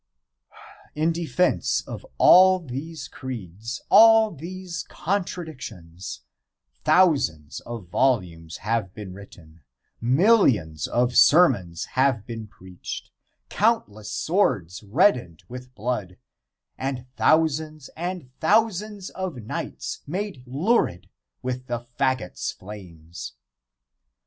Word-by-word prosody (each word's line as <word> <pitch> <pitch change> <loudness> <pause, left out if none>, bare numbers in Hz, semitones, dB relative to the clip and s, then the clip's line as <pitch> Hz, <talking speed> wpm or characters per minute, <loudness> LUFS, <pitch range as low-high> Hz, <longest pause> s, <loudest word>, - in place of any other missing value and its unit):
In 155 +2 +2
defence 170 +2 +1
of - - -8
all 185 +1 +7
these 155 0 -7
creeds, 115 -1 -7
all 225 -1 +7
these 175 +3 -6
contradictions, 135 - -5 0.6
thousands 135 - +2
of 115 -7 -7
volumes 90 -10 0
have 110 -4 -1
been 100 -4 -8
written, 85 -5 -14 0.4
millions 125 - +3
of 120 0 +1
sermons 120 - +4
have 130 -5 +1
been 115 -2 -7
preached, 95 -2 -9 0.4
countless 110 - 0
swords 125 - 0
reddened 110 - +1
with 125 0 -10
blood, 105 -5 -3 0.6
and 130 -2 -3
thousands 155 -2 +1
and 175 -5 -5
thousands 210 +1 +1
of 185 -5 -4
nights - - -5
made 185 -2 -4
lurid 130 - 0 0.3
with 125 0 -4
the 120 - -1 0.2
faggot's 130 -9 -1
flames. 90 -4 -10
130 Hz, 95 wpm, -24 LUFS, -, 0.6 s, all